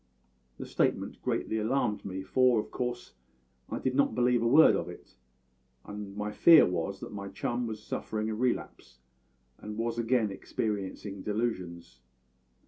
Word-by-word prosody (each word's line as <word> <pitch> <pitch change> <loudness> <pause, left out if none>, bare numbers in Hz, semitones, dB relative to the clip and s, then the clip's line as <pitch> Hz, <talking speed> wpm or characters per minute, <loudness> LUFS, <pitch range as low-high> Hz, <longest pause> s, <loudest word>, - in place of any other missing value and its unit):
The - - -6
statement - - -1
greatly 110 - -1
alarmed 110 -1 0
me, 95 -1 -5
for 125 +4 +3
of - - -5
course 125 -1 -4 0.6
I - - -3
did 130 - -1
not 140 +1 +2
believe 125 -1 +3
a 115 - +2
word 125 -3 +7
of 90 -2 -3
it, 90 - -12 0.7
and 105 -1 -8
my 105 0 -3
fear 165 +8 +7
was 90 +2 -2
that - - -7
my 100 -1 -6
chum 120 +4 -3
was 110 -1 -6
suffering 110 0 -3
a 110 - -2
relapse, 120 - -3 0.6
and 105 0 -7
was 115 +1 -2
again 115 -2 +1
experiencing 100 0 -4
delusions. 95 - -3
110 Hz, 150 wpm, -29 LUFS, 100-120 Hz, 0.7 s, word